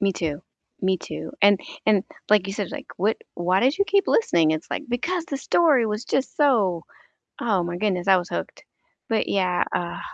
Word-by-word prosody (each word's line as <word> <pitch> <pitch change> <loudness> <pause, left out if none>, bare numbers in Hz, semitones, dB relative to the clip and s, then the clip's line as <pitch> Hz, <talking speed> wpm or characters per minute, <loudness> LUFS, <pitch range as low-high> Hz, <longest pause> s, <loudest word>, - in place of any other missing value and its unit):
Me 195 -1 +2
too, 155 -4 -3 0.4
me 190 -1 +2
too, - - -7
and 200 -1 +6 0.3
and, 205 -3 +3 0.2
like 205 -3 +4
you 195 - -4
said, 200 -3 -4
like, - - -7
"What 210 +4 +1 0.2
why 180 +2 +1
did 270 +9 +2
you 400 - +3
keep 400 0 +2
listening?" 170 - +3
It's 155 0 -3
like, - - -2
"Because 330 +8 -2
the 275 - -4
story 280 -6 +3
was 215 +2 -3
just 265 +1 -1
so" 210 - +2 0.6
oh 205 -6 +1
my 175 0 -4
goodness, 185 -3 -1
I 190 -1 +6
was 180 0 -4
hooked. - - -5 0.4
But 225 -1 0
yeah, 180 -2 +1
uh 175 -1 -3
200 Hz, 195 wpm, -24 LUFS, 180-245 Hz, 0.6 s, and